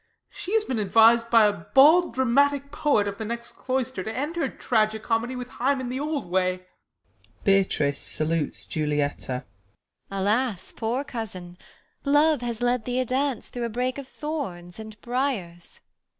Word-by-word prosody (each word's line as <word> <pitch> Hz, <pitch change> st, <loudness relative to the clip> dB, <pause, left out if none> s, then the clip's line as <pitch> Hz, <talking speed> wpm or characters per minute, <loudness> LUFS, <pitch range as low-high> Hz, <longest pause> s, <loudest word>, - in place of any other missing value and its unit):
She 395 Hz, +4 st, -3 dB
has 440 Hz, -1 st, +2 dB
been 250 Hz, -4 st, -2 dB
advis'd 225 Hz, +3 st, +5 dB
by 230 Hz, -2 st, +6 dB
a 205 Hz, -, +3 dB
bald 280 Hz, -, +4 dB
dramatic 280 Hz, +2 st, +2 dB
poet 280 Hz, -9 st, +2 dB
Of 200 Hz, 0 st, -5 dB
the -, -, -3 dB
next 235 Hz, +2 st, -4 dB
cloister, 260 Hz, -6 st, -2 dB
to 220 Hz, -, -4 dB
end 290 Hz, +8 st, -3 dB
her 340 Hz, -, 0 dB
tragi 220 Hz, -2 st, +1 dB
comedy 230 Hz, +3 st, -1 dB
With 250 Hz, 0 st, -5 dB
Hymen 260 Hz, 0 st, -1 dB
the 255 Hz, +2 st, -3 dB
old 295 Hz, 0 st, -2 dB
way. 185 Hz, 0 st, 0 dB, 0.8 s
[Beatrice 190 Hz, -8 st, +2 dB
salutes 155 Hz, -1 st, -1 dB
Juliet. 150 Hz, -2 st, -1 dB
Beat. 125 Hz, -1 st, -3 dB, 0.7 s
Alas, 205 Hz, +2 st, -1 dB
poor 240 Hz, +4 st, -2 dB
cousin! 185 Hz, -9 st, -7 dB, 0.5 s
Love 295 Hz, 0 st, +3 dB
has 240 Hz, -1 st, -3 dB
led 245 Hz, -2 st, +1 dB
thee 250 Hz, 0 st, -1 dB
a 255 Hz, -, +1 dB
dance 265 Hz, +1 st, -1 dB
Through 245 Hz, -1 st, -4 dB
a -, -, -2 dB
brake 250 Hz, +4 st, -2 dB
of 275 Hz, -, -8 dB
thorns 220 Hz, -, -6 dB
and 220 Hz, 0 st, -9 dB
briars. 235 Hz, -10 st, -3 dB
235 Hz, 160 wpm, -25 LUFS, 195-265 Hz, 0.8 s, by